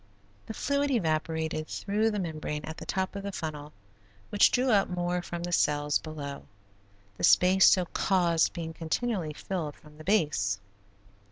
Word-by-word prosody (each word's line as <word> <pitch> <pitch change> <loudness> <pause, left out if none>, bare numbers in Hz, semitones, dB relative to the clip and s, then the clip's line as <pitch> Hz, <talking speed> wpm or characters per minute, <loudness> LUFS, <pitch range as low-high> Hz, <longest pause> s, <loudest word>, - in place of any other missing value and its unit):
The 220 - -6
fluid 280 +1 0
evaporated 160 - -1
through 210 +3 0
the 210 - -2
membrane 155 -4 -4
at 160 - -7
the - - -9
top 190 +1 -2
of 200 - -4
the 200 0 -5
funnel, 150 -4 -6 0.6
which 205 - +6
drew 255 0 +2
up 200 -2 +3
more 180 0 -1
from 175 0 -6
the 175 - -4
cells 150 -3 +2
below, 145 -3 -7 0.7
the - - -7
space 185 +1 +6
so 185 -2 +5
caused 170 -2 +2
being 165 -2 -6
continually 170 0 -2
filled 160 -2 -4
from 150 0 -18
the - - -9
base. 145 - +1
170 Hz, 160 wpm, -28 LUFS, 155-195 Hz, 0.7 s, which